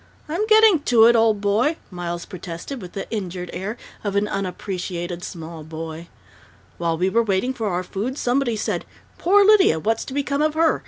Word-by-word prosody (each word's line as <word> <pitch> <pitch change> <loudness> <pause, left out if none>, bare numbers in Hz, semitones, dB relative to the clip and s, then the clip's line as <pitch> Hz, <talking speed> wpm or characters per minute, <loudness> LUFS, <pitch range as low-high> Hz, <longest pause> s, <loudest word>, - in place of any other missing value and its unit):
"I'm 350 +8 -1
getting 435 -5 +6
to 240 -5 +5
it, 235 +1 +6
old 225 -3 +3
boy," 225 +11 +2
Miles 175 -1 -4
protested, 185 +7 -7
with 180 -2 -9
the 195 - -5
injured 180 -4 -4
air 200 +6 -4 0.3
of 200 -2 -2
an 200 +1 +2
unappreciated 180 -2 -4
small 165 -2 -7
boy. 160 +1 -7 0.7
"While 165 -1 0
we 180 +3 +1
were 230 +5 +3
waiting 220 +4 0
for 225 -4 -3
our 180 -2 -1
food, 220 +9 -4
somebody 245 -2 +1
said, 215 - -2 0.4
'Poor 400 +3 +5
Lydia! 405 - +6
What's 225 +6 0
going - - -7
to 260 - -6
become 280 0 0
of 310 0 +1
her?' 325 0 +3
205 Hz, 190 wpm, -22 LUFS, 175-265 Hz, 0.7 s, getting